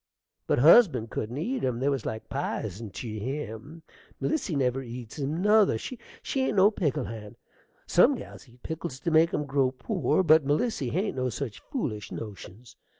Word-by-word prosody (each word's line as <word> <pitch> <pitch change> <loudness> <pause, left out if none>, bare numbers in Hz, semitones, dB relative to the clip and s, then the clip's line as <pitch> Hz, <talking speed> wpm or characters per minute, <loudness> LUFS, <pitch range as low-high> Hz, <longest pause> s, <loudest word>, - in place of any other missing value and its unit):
But - - +2
husband 145 - +6
couldn't 115 +5 -4
eat 240 - -2
'em: 125 -3 0
they 135 - 0
was 135 -5 0
like 110 0 -5
pizen 105 +4 -4
tew 110 +3 -6
him. 135 +5 -6 0.4
Melissy 290 - -1
never 130 -1 +1
eats 120 0 -8
'em 150 +6 -2
nother: 210 - +5
she 245 - -7 0.4
ain't 265 -4 +1
no 200 +2 +6
pickle 150 - -1
hand. 105 -2 -8 0.5
Some - - +5
gals - - -10
eat 120 +1 -22
pickles 160 -4 -5
to 170 - -1
make 160 +1 +5
'em 150 - -1
grow 135 -2 +2
poor, 185 - 0
but 160 -2 +6
Melissy 145 - 0
hain't 185 - -1
no 130 0 0
such 115 -4 -5
foolish 110 - -4
notions. 105 +2 -9
135 Hz, 170 wpm, -27 LUFS, 115-165 Hz, 0.5 s, husband